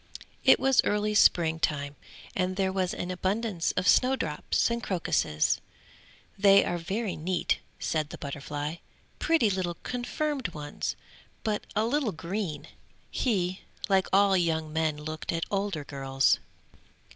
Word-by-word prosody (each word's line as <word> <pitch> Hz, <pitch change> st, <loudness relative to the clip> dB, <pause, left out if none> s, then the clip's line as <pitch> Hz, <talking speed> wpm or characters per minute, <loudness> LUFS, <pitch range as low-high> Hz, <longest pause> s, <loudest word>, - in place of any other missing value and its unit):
It -, -, +7 dB
was 270 Hz, -1 st, +4 dB
early 210 Hz, +1 st, 0 dB
spring 165 Hz, -5 st, +4 dB
time, 145 Hz, -2 st, -1 dB, 0.4 s
and 185 Hz, 0 st, 0 dB
there 190 Hz, -1 st, +1 dB
was 185 Hz, -2 st, 0 dB
an 180 Hz, -, -4 dB
abundance 190 Hz, 0 st, -1 dB
of 185 Hz, -, -1 dB
snow 260 Hz, +1 st, +5 dB
drops 160 Hz, -, 0 dB
and 235 Hz, 0 st, -1 dB
crocuses. 165 Hz, -, 0 dB, 0.8 s
"They 195 Hz, 0 st, +6 dB
are 175 Hz, -, -2 dB
very 195 Hz, +4 st, -2 dB
neat," 175 Hz, +2 st, 0 dB, 0.2 s
said 155 Hz, -2 st, -1 dB
the -, -, -8 dB
butterfly, 145 Hz, +2 st, -5 dB, 0.4 s
"pretty 290 Hz, -11 st, +3 dB
little 180 Hz, -2 st, -2 dB
confirmed 250 Hz, -, -2 dB
ones, 145 Hz, -1 st, -4 dB, 0.5 s
but 215 Hz, -2 st, -2 dB
a 215 Hz, +1 st, +2 dB
little 260 Hz, -2 st, 0 dB
green!" 170 Hz, 0 st, -4 dB, 0.4 s
He, 185 Hz, -6 st, 0 dB, 0.3 s
like 190 Hz, -1 st, +3 dB
all 195 Hz, 0 st, +5 dB
young 160 Hz, -3 st, 0 dB
men 160 Hz, -1 st, 0 dB
looked 155 Hz, +1 st, -5 dB
at 165 Hz, -1 st, -1 dB
older 195 Hz, -6 st, -1 dB
girls. 135 Hz, -2 st, +1 dB
185 Hz, 135 wpm, -28 LUFS, 155-210 Hz, 0.8 s, It